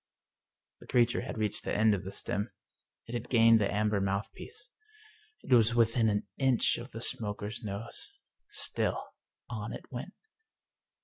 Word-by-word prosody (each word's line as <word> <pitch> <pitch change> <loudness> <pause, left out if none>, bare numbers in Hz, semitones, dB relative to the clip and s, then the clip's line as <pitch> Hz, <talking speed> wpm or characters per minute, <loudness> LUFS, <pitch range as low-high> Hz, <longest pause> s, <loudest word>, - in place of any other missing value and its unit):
The - - -15
creature 120 -1 +3
had 130 - -6
reached 105 -1 -2
the - - -2
end 110 0 +5
of 100 -1 -2
the 95 - -6
stem. 100 +2 -2 0.6
It 115 - -9
had 120 - -4
gained 115 -2 +6
the 100 - +1
amber 105 -1 +1
mouthpiece. 100 - -4 0.7
It - - +1
was 115 0 +5
within 115 -1 +3
an 105 -1 0
inch 130 -3 +3
of 120 - -8
the 115 - -8
smoker's 105 -1 -2
nose. 105 - -6 0.4
Still - - -1 0.5
on - - -4
it - - -8
went. - - -6
110 Hz, 150 wpm, -31 LUFS, 105-120 Hz, 0.7 s, gained